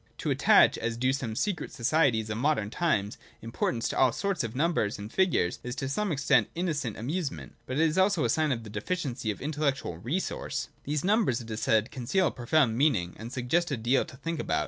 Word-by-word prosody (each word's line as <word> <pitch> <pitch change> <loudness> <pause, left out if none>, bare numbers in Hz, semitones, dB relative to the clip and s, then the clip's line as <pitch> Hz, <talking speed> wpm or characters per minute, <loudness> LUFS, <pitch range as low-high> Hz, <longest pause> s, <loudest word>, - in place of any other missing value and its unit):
To - - -2
attach, - - +5
as 115 0 -2
do 130 +2 +1
some 120 -5 -3
secret 195 - -2
societies 120 -4 +1
of 110 - -3
modern 130 -7 +1
times, 110 - 0 0.2
importance 115 +1 -1
to - - -3
all 130 - +5
sorts 195 - -1
of 115 +1 -5
numbers 145 -8 +1
and 105 +1 -8
figures, 180 - +1
is 125 0 -5
to 140 -2 -3
some 200 +8 -1
extent 135 -6 +3
an - - -33
innocent 150 - -2
amusement, 145 +6 -4
but 130 - -3
it 160 - +4
is 160 +4 0
also 190 -6 +3
a - - +1
sign 155 +4 +2
of 115 -3 -2
deficiency 120 - -3
of 105 - -3
intellectual 140 - -2
resource. 145 - -3 0.2
These 145 0 -1
numbers, 205 - +2
it 115 -2 -9
is 110 - -4
said, 110 +2 +2
conceal 140 +9 0
a - - +1
profound 120 -1 +1
meaning, 110 - +2
and 115 +2 -7
suggest 140 +7 0
a 140 - -1
deal 120 +4 +2
to 130 - -13
think 165 +3 -4
about. - - 0
130 Hz, 215 wpm, -28 LUFS, 115-155 Hz, 0.2 s, attach